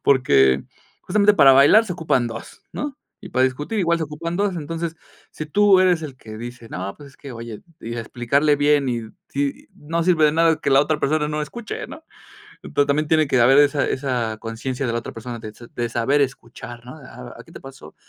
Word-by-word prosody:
Porque, 70 - +3 0.4
justamente 210 0 +3
para 140 -8 +7
bailar 145 +12 +6
se 200 - -5
ocupan 160 -8 0
2, 115 - -9
¿no? 290 -2 -5 0.3
Y - - -8
para 130 -5 +2
discutir 145 - -2
igual 170 -3 +1
se 160 - -2
ocupan 165 +3 -5
2. 200 -2 0
Entonces, 165 +1 -5 0.3
si 155 - -7
tú 200 +4 +4
eres 180 -3 +3
el 140 -4 -7
que 110 -3 -11
dice: 120 0 -9
"No 95 0 -5
pues, 145 -2 -13
es - - -23
que 140 - -11
oye" 115 -2 -8 0.2
y 115 +1 -6
explicarle 130 +6 +1
bien 145 -1 +2
y 120 -2 -2 0.3
sí, 140 0 -3
no 165 +3 -3
sirve 165 -3 +3
de 150 - +4
nada 165 0 +3
que - - -2
la 135 0 +6
otra 150 +1 0
persona 150 +1 0
no 150 0 -2
escuche, 215 +9 -6
¿no? 320 - -11 0.6
Ento 145 - +1
también 145 +2 0
tiene 155 -1 +2
que 130 - +2
haber 130 +4 +6
esa 145 0 +3
esa 125 -5 -2
conciencia 125 +4 -4
de - - -1
la 120 - -1
otra 115 - -7
persona 120 +1 -7
de 110 -1 -8
s 120 +2 -15
de 120 -1 -3
saber 120 +5 +1
escuchar, 120 -3 -5
¿no? 125 +4 -10
"Ah 65 - -11
ah, - - -10
¿qué - - -17
te - - -11
pasó? 135 -13 -13
140 Hz, 220 wpm, -21 LUFS, 120-160 Hz, 0.6 s, para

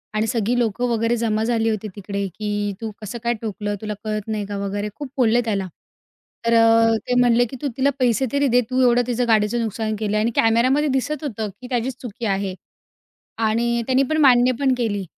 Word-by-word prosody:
आणि 220 +1 +1
सगळी 230 +1 0
लोकं 240 +2 0
वगैरे 230 +1 +1
जमा 220 -1 0
झाली 225 -1 +1
होती 215 -1 -2
तिकडे 200 0 -4
की 205 -1 -2
"तू 225 - -4
कसं 210 +3 -6
काय 235 0 +1
ठोकलं? 205 -1 -3
तुला 215 -1 -3
कळत 215 -1 -3
नाही 215 -2 -2
का?" 205 0 -4
वगैरे 205 +1 -3
खूप 290 -3 -7
बोलले 240 -1 +3
त्याला. 195 -4 -1 0.8
तर 230 - +2
अ, 225 0 +5
ते 250 - +1
म्हणले 245 0 +4
की, 265 - -8
"तू 290 - -1
तिला 275 +2 +3
पैसे 250 +1 +2
तरी 280 0 +2
दे. 245 0 +4
तू 255 0 +1
एवढं 245 -1 +4
तिचं 245 0 0
गाडीचं 220 +2 +2
नुकसान 220 0 -2
केलं." 215 -1 -1
आणि 225 +2 +1
कॅमेऱ्यामध्ये 255 +6 +3
दिसत 285 +3 -1
होतं 220 -6 -3
की 250 - -8
त्याचीच 245 0 -1
चुकी 235 -1 -6
आहे 195 -2 -1 0.9
आणि 235 +1 0
त्यांनी 260 +1 +3
पण 310 - +1
मान्य 250 0 +5
पण 265 -2 +3
केली. 205 -5 -1
230 Hz, 200 wpm, -21 LUFS, 215-245 Hz, 0.9 s, अ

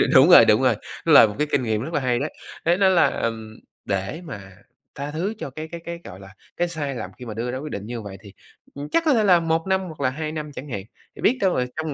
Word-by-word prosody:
đúng - - +8
rồi, - - +9
đúng - - +4
rồi, - - +4 0.3
nó - - +2
là - - +9
một 105 - -7
cái 150 - +1
kinh 130 - +1
nghiệm 110 -2 -1
rất 155 +7 -6
là 150 - +1
hay 125 -2 +1
đấy. 145 +3 -3 0.3
Thế 170 +2 +3
nên 190 -1 +4
là, 170 - +5
ừm, 110 -1 -4 0.3
để 100 - -3
mà 100 - -9 0.4
tha 140 +1 -5
thứ 175 +8 -2
cho - - -5
cái 155 +4 -7
cái 170 -1 -7
cái, 170 0 -6
gọi 90 - -10
là, 95 +1 -14 0.2
cái 175 - +1
sai 150 -5 -4
lầm - - -6
khi 125 - -8
mà 110 - -6
đưa 115 +3 -3
ra 130 - -4
quyết 150 +2 -7
định 100 0 -5
như 120 -1 -5
vậy 100 -2 -9
thì, 100 -3 -14 0.4
ừm, 145 +1 -6
chắc 330 - +2
có 305 - +4
thể 225 -4 +3
là 180 -4 +5
1 165 +1 -1
năm 190 0 +2
hoặc 165 -5 -8
là 130 - +2
2 155 +3 -4
năm 155 -1 -5
chẳng 145 +1 -9
hạn. 100 -6 -4 0.3
Thì - - -11
biết 255 - +3
đâu, 190 -2 +2
ờ, 125 - +1
trong 155 -1 -3
145 Hz, 290 wpm, -23 LUFS, 115-170 Hz, 0.4 s, rồi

